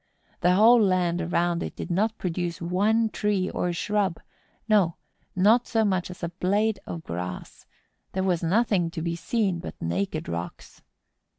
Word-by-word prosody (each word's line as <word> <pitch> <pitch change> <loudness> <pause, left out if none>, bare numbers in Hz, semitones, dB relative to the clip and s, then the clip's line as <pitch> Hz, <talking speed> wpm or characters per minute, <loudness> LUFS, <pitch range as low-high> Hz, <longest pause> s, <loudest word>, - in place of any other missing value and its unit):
The 180 +1 +3
whole 230 +4 +7
land 180 -3 +2
around 175 0 0
it - - -5
did - - -6
not 215 +5 +1
produce 175 -1 -3
one 205 +6 +2
tree 205 -3 0
or 180 - -1
shrub; 195 0 -1 0.5
no, 200 -7 +3 0.4
not 215 +6 +4
so 225 -1 +2
much 185 -3 0
as 180 0 -10
a 170 - -1
blade 200 +4 0
of 165 -1 -6
grass; 90 - -6 0.5
there 190 - -1
was 180 -3 +1
nothing 185 -1 +2
to 165 -1 -6
be 170 0 -1
seen 190 0 -1
but 170 - -8
naked 90 +4 -2
rocks. 85 +1 -6
180 Hz, 160 wpm, -26 LUFS, 170-210 Hz, 0.5 s, whole